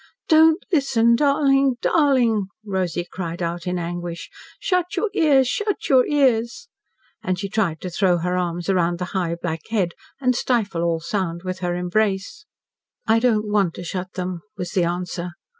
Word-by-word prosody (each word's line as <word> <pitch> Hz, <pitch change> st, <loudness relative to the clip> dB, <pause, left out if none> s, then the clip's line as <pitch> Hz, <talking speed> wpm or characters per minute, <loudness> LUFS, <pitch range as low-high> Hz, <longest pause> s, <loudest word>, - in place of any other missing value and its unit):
"Don't 320 Hz, 0 st, +5 dB
listen 235 Hz, -6 st, +3 dB
darling 275 Hz, -1 st, +3 dB
darling!" 245 Hz, -, +2 dB, 0.2 s
Rosy 180 Hz, -4 st, -2 dB
cried 170 Hz, -2 st, -6 dB
out 170 Hz, 0 st, -3 dB
in 180 Hz, 0 st, -1 dB
anguish. 175 Hz, 0 st, -5 dB, 0.3 s
"Shut 360 Hz, -1 st, 0 dB
your 405 Hz, +3 st, 0 dB
ears 280 Hz, -5 st, +4 dB
shut 415 Hz, -, -2 dB
your 260 Hz, -2 st, +5 dB
ears!" 265 Hz, -, +1 dB, 0.5 s
And 185 Hz, 0 st, -1 dB
she 200 Hz, +2 st, -3 dB
tried 190 Hz, -6 st, -1 dB
to 180 Hz, -, -5 dB
throw 180 Hz, 0 st, +2 dB
her 180 Hz, +2 st, -1 dB
arms 175 Hz, -1 st, -2 dB
around 175 Hz, -3 st, +1 dB
the 180 Hz, -, -3 dB
high 175 Hz, -3 st, -1 dB
black 165 Hz, -2 st, -4 dB
head, 200 Hz, -6 st, 0 dB, 0.3 s
and 255 Hz, -2 st, +1 dB
stifle 220 Hz, -9 st, 0 dB
all 170 Hz, -1 st, 0 dB
sound 170 Hz, -1 st, -3 dB
with 185 Hz, 0 st, -4 dB
her 175 Hz, -1 st, -1 dB
embrace. 195 Hz, -, -1 dB, 0.6 s
"I 225 Hz, 0 st, +4 dB
don't 220 Hz, -3 st, +1 dB
want 200 Hz, -5 st, +1 dB
to -, -, -7 dB
shut 185 Hz, +1 st, -5 dB
them," 180 Hz, -2 st, -4 dB, 0.2 s
was 180 Hz, -2 st, -4 dB
the 180 Hz, -3 st, +1 dB
answer. 175 Hz, 0 st, -3 dB
190 Hz, 165 wpm, -22 LUFS, 175-250 Hz, 0.6 s, Don't